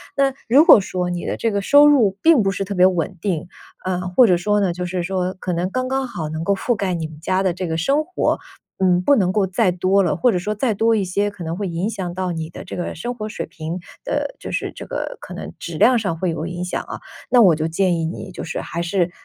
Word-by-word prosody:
那 275 -1 +2
如 270 +6 +6
果 315 - +9
说， 180 -2 -2
你 175 -1 -4
的 - - -2
这 230 - 0
个 200 - -1
收 285 +8 +6
入 230 -10 +4
并 320 -6 +5
不 195 - +1
是 195 0 -2
特 200 +1 -5
别 180 -1 +5
稳 180 0 -1
定， 175 -5 -2 0.4
呃， 180 0 -2
或 210 +8 +5
者 180 -5 +4
说 210 +3 +1
呢， 190 -3 +1
就 180 0 -4
是 180 0 -2
说 185 0 -1
可 180 - -3
能 175 +2 -1
刚 255 +5 -2
刚 265 -1 -1
好， 170 -10 -5
能 160 +1 -4
够 200 - +2
覆 240 +5 0
盖 195 -3 -1
你 160 -2 -3
们 155 -1 -13
家 185 +4 0
的 185 -2 +1
这 185 0 -4
个 160 - -2
生 275 - +1
活， 365 - 0 0.4
嗯， 180 -1 +3
不 285 +9 +4
能 185 -5 +2
够 200 -1 +2
再 190 +1 +1
多 185 +3 +2
了。 170 - +1
或 240 +8 +3
者 180 - 0
说 210 +4 -3
再 225 +1 0
多 225 +2 +2
一 205 - +1
些， 200 +3 0
可 205 -3 -9
能 165 0 -3
会 200 -2 -2
影 175 +4 -2
响 180 -5 -4
到 185 0 -2
你 160 -1 -4
的 - - -9
这 - - -7
个 175 - -4
生 240 +10 -4
活 215 -3 -5
水 - - -5
平 160 +2 -6 0.3
的 - - -2
就 - - -7
是 - - -2
这 - - -8
个 - - -4
可 - - -10
能 - - -7
质 - - -6
量 250 -2 +5
上 190 -7 -2
会 180 +1 -1
有 165 0 -4
影 175 0 -5
响 180 - -2
啊， - - -7 0.3
那 245 -2 +6
我 180 -6 +6
就 155 +1 -1
建 175 +1 +1
议 165 - -1
你 185 +3 -6
就 - - -7
是 - - -4
还 170 - -4
是， 175 0 0
185 Hz, 295 characters per minute, -21 LUFS, 175-210 Hz, 0.4 s, 果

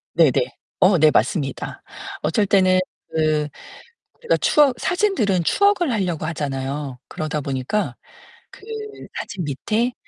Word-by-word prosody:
네네. - - +6 0.5
어 185 -1 +5
네 155 0 +5
맞습니다. 145 -10 -1 0.4
어쩔 165 +7 +1
때는 185 -2 +4 0.3
그 155 -1 +1 0.7
제가 475 - +2
추억 280 -4 +3
사진들은 355 - +1
추억을 395 - +3
하려고 180 -8 -1
하잖아요. 140 -3 -3
그러다 155 -1 -3
보니까 135 +10 -2 0.6
그 - - -15 0.6
사진 185 -4 -4
밑에 215 - -1
175 Hz, 250 characters per minute, -22 LUFS, 150-215 Hz, 0.7 s, 네네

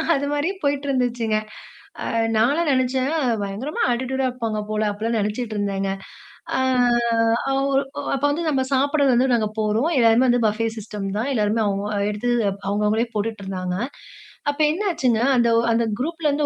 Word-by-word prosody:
அது 275 - -1
மாரி 290 +5 0
போயிட்டுருந்துச்சுங்க. 250 -6 0 0.7
ஆ - - -4 0.3
நான்லாம் 285 +9 +2
நெனைச்சேன், 260 +1 +1 0.3
"பயங்கரமா 205 +9 -4
அட்டிட்யூடா 260 +2 -1
இருப்பாங்க 230 -4 -3
போல" 215 0 -1
அப்படிலாம் 225 +3 -2
நெனைச்சிட்ருந்தேங்க. 205 -3 -2 0.7
ஆ - - +1 0.9
அவர் 275 0 +1 0.3
அப்போ 275 +1 -1
வந்து 330 +3 -2
நம்ம 270 -3 +1
சாப்பிட 280 +2 +2
வந்து 250 +2 +3
நாங்க 220 -2 +1
போறோம். 215 +7 +1
எல்லாமே 230 +1 +5
வந்து 245 -1 +3
பஃபே 215 +2 0
சிஸ்டம் 210 -2 -5
தான். 245 - -1
எல்லோருமே 215 +1 +1
அவங்க 200 0 -1 0.3
எடுத்து 210 +4 -2 0.4
அவங்கவங்களே 210 +3 +1
போட்டுட்டு 215 0 -2
இருந்தாங்க. 185 -1 -3 0.7
அப்போ 290 +2 -2
என்னாச்சுன்னா, 310 - 0
அந்த 235 -1 +3
ஒ - - +5
அந்த 230 +1 +2 0.2
குரூப்லேருந்து 300 0 0
235 Hz, 140 wpm, -22 LUFS, 215-275 Hz, 0.9 s, எல்லாமே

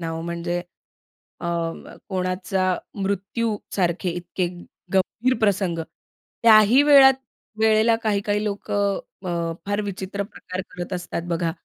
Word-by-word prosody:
ना, 165 -1 -3
ओ 165 - -4
म्हणजे 170 +1 -3 0.8
अ, - - -6 0.6
कोणाचा 185 0 0 0.2
मृत्यू 200 +3 -1 0.2
सारखे 180 -1 0
इतके 175 +1 -3 0.5
गंभीर 220 +7 +2
प्रसंग, 195 -5 +1 0.6
त्याही 225 +3 +7
वेळात 275 -2 +8 0.5
वेळेला 220 +1 +4
काही 205 -2 +1
काही 205 0 +1
लोकं 200 -1 -1 0.3
अ, 170 -2 -1
फार 205 +1 0
विचित्र 200 0 -4
प्रकार 185 -2 -7
करत 175 +1 -5
असतात 175 -1 -3
बघा. 170 -1 0
195 Hz, 120 wpm, -23 LUFS, 175-210 Hz, 0.8 s, वेळात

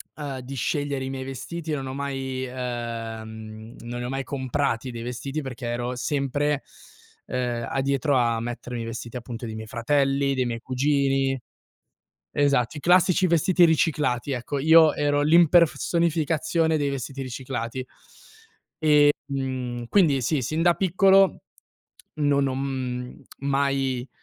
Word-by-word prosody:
ehm, 140 -3 -5
di 130 +2 -7
scegliere 140 +1 -1
i - - -4
miei 135 -1 -4
vestiti, 155 +5 -6
non 135 -2 -3
ho 130 - -5
mai 135 -2 -3
ehm, 115 -3 -6
non 120 +1 -6
li - - -4
ho - - -4
mai 135 +1 -2
comprati 130 -2 -2
dei 115 -1 -6
vestiti 135 +5 -4
perché 125 -3 -6
ero 120 +1 -2
sempre, 145 +2 -1 0.6
ehm, 120 -2 -2
addietro 140 +1 +1
a 115 -2 +1
mettermi 120 0 -5
i - - -5
vestiti 115 +1 -7
appunto 120 0 -7
dei 110 -1 -6
miei 110 0 -7
fratelli, 135 +4 +1
dei 130 -1 +1
miei 115 -1 -3
cugini. 135 +1 +1 0.9
Esatto, 140 -2 +2
i - - -5
classici 180 +3 +4
vestiti 175 +2 +3
riciclati. 150 -5 +1
Ecco, 130 +2 -3
io 160 +2 +6
ero 145 0 +1
l'impersonificazione 165 0 +3
dei 145 -1 0
vestiti 135 0 -5
riciclati. 130 -1 -4
E, 130 - -6 1.5
mhmm, 130 -3 -3
quindi 155 -10 +4
sì, 150 +3 +1
sin 155 +7 -1
da 175 0 +5
piccolo 190 +2 +4 0.7
non 145 -2 +2
ho, 130 - -2
mhmm, 130 -2 -4 0.2
mai, 135 -2 0
135 Hz, 140 wpm, -25 LUFS, 125-145 Hz, 1.5 s, io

